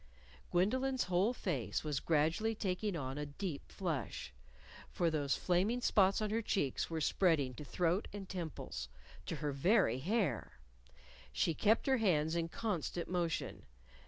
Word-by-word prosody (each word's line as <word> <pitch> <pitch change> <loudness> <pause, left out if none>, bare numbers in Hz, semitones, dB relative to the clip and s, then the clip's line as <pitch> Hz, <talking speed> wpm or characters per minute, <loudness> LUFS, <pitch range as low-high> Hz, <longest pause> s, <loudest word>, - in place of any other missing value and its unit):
Gwendolyn's 255 +9 +2
whole 185 +5 +2
face 170 - -2
was 150 -2 -1
gradually 165 +10 +1
taking 200 0 -1
on 135 -2 -3
a 150 - -2
deep 145 +1 -5
flush, 140 - -3 0.6
for 170 -2 +1
those 145 -3 +1
flaming 190 +7 +1
spots 200 -3 +3
on 210 - -1
her 225 +1 +1
cheeks 170 - 0
were 165 -1 -2
spreading 150 -6 +2
to 150 - -8
throat 175 +6 0
and 200 -2 -7
temples 170 - -5 0.4
to - - -2
her 150 -1 -2
very 140 - +3
hair. 180 - 0 0.8
She 165 - +1
kept 220 +7 +3
her 265 -1 +3
hands 165 -7 +2
in 165 -1 0
constant 175 -4 -2
motion. 170 - -2
175 Hz, 145 wpm, -35 LUFS, 150-205 Hz, 0.8 s, spots